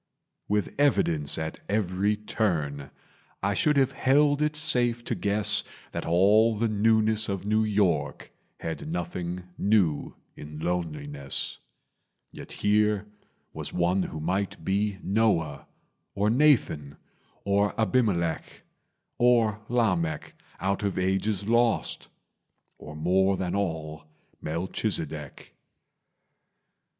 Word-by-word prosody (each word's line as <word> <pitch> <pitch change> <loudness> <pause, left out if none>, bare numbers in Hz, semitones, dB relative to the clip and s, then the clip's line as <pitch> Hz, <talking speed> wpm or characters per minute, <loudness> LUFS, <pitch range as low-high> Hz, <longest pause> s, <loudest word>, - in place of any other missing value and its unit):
With 105 0 -1
evidence 85 - +2
at 80 0 -4
every 100 0 +1
turn, 80 -10 -2 0.5
I 100 +1 +1
should 150 +9 +2
have 135 -1 +3
held 145 +2 +3
it 150 0 +1
safe 125 -6 +2
to - - -2
guess 105 +1 +2 0.3
That - - -5
all 105 +7 +4
the 115 +2 0
newness 110 0 +2
of 95 -1 -3
New 110 +1 +2
York 95 -9 0 0.3
Had 80 -1 -5
nothing 90 +1 -4 0.2
new 95 -8 +1 0.2
in 75 +1 -9
loneliness; 75 -5 -3 0.7
Yet - - -10
here 105 0 +1 0.5
was - - -5
one 90 +2 +1
who 80 -3 -5
might 95 +5 -2
be 100 +1 0
Noah, 95 -9 0 0.5
Or 105 +2 +2
Nathan, 115 - +2 0.5
or 100 +2 +1
Abimelech, 105 -8 0 0.6
Or 115 -4 +3
Lamech, 90 -10 0 0.3
out 100 +1 -1
of 100 -2 -2
ages 95 +2 0
lost, 115 0 +1 0.7
Or, 75 - -10
more 95 +5 +2
than 90 -1 -2
all, 80 -5 -3 0.4
Melchizedek. 80 - -3
100 Hz, 105 wpm, -27 LUFS, 85-110 Hz, 0.7 s, all